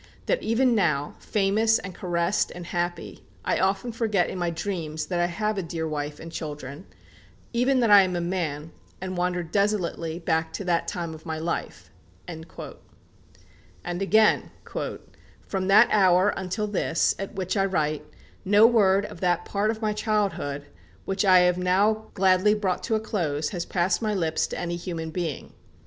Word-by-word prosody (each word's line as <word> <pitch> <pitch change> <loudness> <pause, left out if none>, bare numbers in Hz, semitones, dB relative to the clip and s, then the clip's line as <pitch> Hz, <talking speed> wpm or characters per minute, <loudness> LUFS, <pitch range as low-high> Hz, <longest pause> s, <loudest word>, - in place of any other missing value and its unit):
that - - +1
even 240 +3 +2
now, 155 -9 +1
famous 215 +2 +2
and 190 -1 -7
caressed 175 +1 0
and 175 -1 -7
happy, 175 0 -4 0.2
I - - +1
often 195 +5 0
forget 220 -5 0
in 185 - -5
my 175 -1 0
dreams 165 -3 -4
that 175 -2 -2
I 175 - +2
have 210 +3 -2
a - - 0
dear 165 -2 -4
wife 150 -1 -4
and 165 - -9
children; 150 0 -7 0.7
even 255 +2 +2
that 230 -3 +3
I 205 -1 +10
am 185 -2 0
a - - 0
man, 165 -4 -3 0.3
and 185 0 -5
wander 180 0 0
desolately 170 -3 -1
back 160 -2 -1
to - - -4
that 175 -2 0
time 170 -4 -4
of 160 +2 -12
my 160 0 -3
life." 165 +2 -4 0.4
And 160 -2 -7 1.4
again: 195 +5 +2 1.0
"From 190 -1 -2
that 210 +4 +7
hour 190 -1 +5
until 195 +3 -2
this, 205 -5 +1
at 195 - -6
which 185 0 -2
I 195 -1 +2
write, 155 -5 -1 0.4
no 205 +2 +6
word 205 -4 +4
of 175 - -9
that 175 -1 +1
part 205 +1 0
of 220 0 -3
my 215 -1 +1
childhood, 195 -10 -1 0.4
which 195 +1 0
I 185 -2 +6
have 180 0 +3
now 205 +4 +2
gladly 190 +2 +4
brought 195 -4 -1
to 220 - +1
a - - +1
close, 155 -9 -2
has 175 -3 -4
passed 175 +1 +1
my 215 -2 0
lips 165 -4 0
to - - -6
any 175 0 -3
human 165 -2 -5
being.... 165 -4 -4
185 Hz, 170 wpm, -25 LUFS, 170-205 Hz, 1.4 s, I